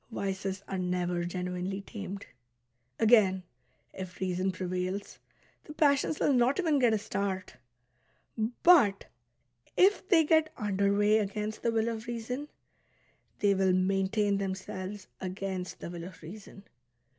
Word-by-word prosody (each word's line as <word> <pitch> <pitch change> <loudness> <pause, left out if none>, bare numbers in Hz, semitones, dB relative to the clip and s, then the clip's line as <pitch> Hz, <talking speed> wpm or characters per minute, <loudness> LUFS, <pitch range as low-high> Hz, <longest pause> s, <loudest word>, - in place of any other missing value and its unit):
Vices 195 -2 -3
are 190 - -3
never 180 -1 -1
genuinely 180 +2 -3
tamed. 200 -2 -7 0.7
Again, 210 -5 +4 0.5
if 185 -1 -8
reason 185 0 0
prevails, 185 +2 -4 0.5
the 300 - -10
passions 290 0 +2
will 285 - +3
not 250 +4 +3
even 320 -6 +2
get 245 -3 +4
a - - +2
start; 200 -2 -3 1.1
but 260 - +6 0.7
if 380 0 +4
they 330 -4 +6
get 315 0 +3
under 200 -1 +1
way 205 +2 +4
against 210 +1 -3
the 235 - +1
will 225 0 +1
of 230 0 -4
reason, 240 +4 -4 0.9
they 205 -1 +4
will 190 -1 +2
main 190 +1 +2
tain 205 -1 +1
themselves 190 0 -5
against 185 0 -4
the - - -6
will 170 -1 -6
of 185 -2 -12
reason. 195 +3 -11
200 Hz, 135 wpm, -30 LUFS, 185-225 Hz, 1.1 s, but